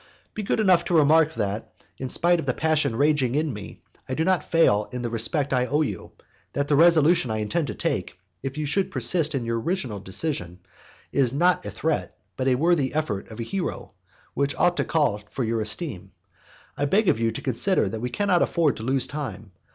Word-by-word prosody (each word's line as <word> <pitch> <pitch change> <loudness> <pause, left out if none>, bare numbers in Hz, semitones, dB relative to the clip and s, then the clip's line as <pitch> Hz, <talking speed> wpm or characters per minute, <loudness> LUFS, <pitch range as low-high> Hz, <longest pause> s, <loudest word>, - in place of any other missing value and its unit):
Be 215 - -4
good 205 - -1
enough 185 -5 +4
to 175 - 0
remark 160 +1 +4
that, 105 0 -3 0.3
in 130 - -4
spite 175 +4 +2
of 140 - -5
the 130 - 0
passion 155 -6 +1
raging 140 -2 +2
in 150 -2 0
me, 105 -1 -10 0.3
I 130 - -1
do 160 - 0
not 185 -1 +2
fail 105 -11 +2
in 125 -1 -5
the 120 - -3
respect 135 +5 +1
I 125 -1 +1
owe 150 +3 +1
you; 100 - -6 0.4
that 140 +1 -1
the 145 - +2
resolution 165 -3 +5
I 110 - -1
intend 145 +9 -1
to 105 - -5
take, - - -2 0.2
if 135 +2 -5
you 155 - -2
should 190 +7 0
persist 145 +5 +1
in 125 -3 -2
your 115 0 -1
original 130 - -2
decision, 95 - -4 0.5
is 135 -2 +2
not 180 +4 +2
a - - -3
threat, 160 -1 -2 0.2
but 130 - -2
an 130 - +4
effort - - -4
worthy 160 -4 +2
of 155 -6 0 0.3
a - - -2
hero, 185 +9 -4 0.4
which 140 +1 0
ought 175 -1 +2
to - - +2
call 145 -10 +1
for 130 - -3
your 115 0 -1
esteem. 105 - -3 0.6
I 145 - -1
beg 200 +9 +2
of 110 - +3
you 115 0 +1
to 115 - -5
consider 135 - +1
that 110 +3 -5
we 125 - -2
cannot 185 +5 +1
afford 160 -4 +1
to 110 - -7
lose 130 +1 0
time. 130 -8 -6
140 Hz, 215 wpm, -24 LUFS, 115-160 Hz, 0.6 s, resolution